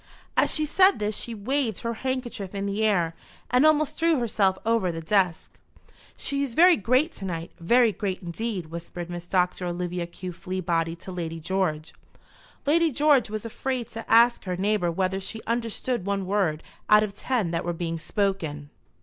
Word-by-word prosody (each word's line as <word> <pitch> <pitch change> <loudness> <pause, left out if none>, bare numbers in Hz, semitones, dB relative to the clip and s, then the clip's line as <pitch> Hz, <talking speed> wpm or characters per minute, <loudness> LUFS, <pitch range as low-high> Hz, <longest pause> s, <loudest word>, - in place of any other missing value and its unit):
As - - +3
she 310 - +1
said 375 +6 +4
this 210 0 -2
she 235 - -4
waved 230 0 -1
her 230 0 -2
handkerchief 240 -5 -4
in 200 0 -2
the 200 +2 -1
air 175 -6 +2 0.4
and 250 +3 +4
almost 305 -1 +2
threw 330 -1 +3
herself 205 -6 +1
over 225 -5 +2
the 165 - -5
desk. 180 0 0 0.6
"She 280 0 -2
is 265 -5 -3
very 350 +1 +7
great 255 - +2
to 195 - -6
night, 170 -2 -4
very 235 +7 +4
great 190 -1 -3
indeed," 180 -1 -4
whispered 170 +1 -6
Miss 175 0 -6
Doctor 180 0 +1
Olivia 175 0 -3
Q. 180 +1 -7
Fleabody 170 -3 -2
to 190 - -8
Lady 165 -2 -4
George. 160 -3 -1 0.7
Lady 325 +2 +3
George 285 -3 +3
was 215 +1 -4
afraid 250 +1 -3
to 225 0 -7
ask 235 +1 +5
her 180 -1 -2
neighbour 195 -2 +1
whether 190 +2 -1
she 195 +3 -5
understood 235 0 -2
one 200 0 -1
word 185 -6 0 0.3
out 210 0 +7
of 205 -2 -3
ten 215 -4 -1
that 170 0 -1
were 175 - -1
being 165 -1 -3
spoken. 160 -7 -2
200 Hz, 175 wpm, -26 LUFS, 175-235 Hz, 0.7 s, very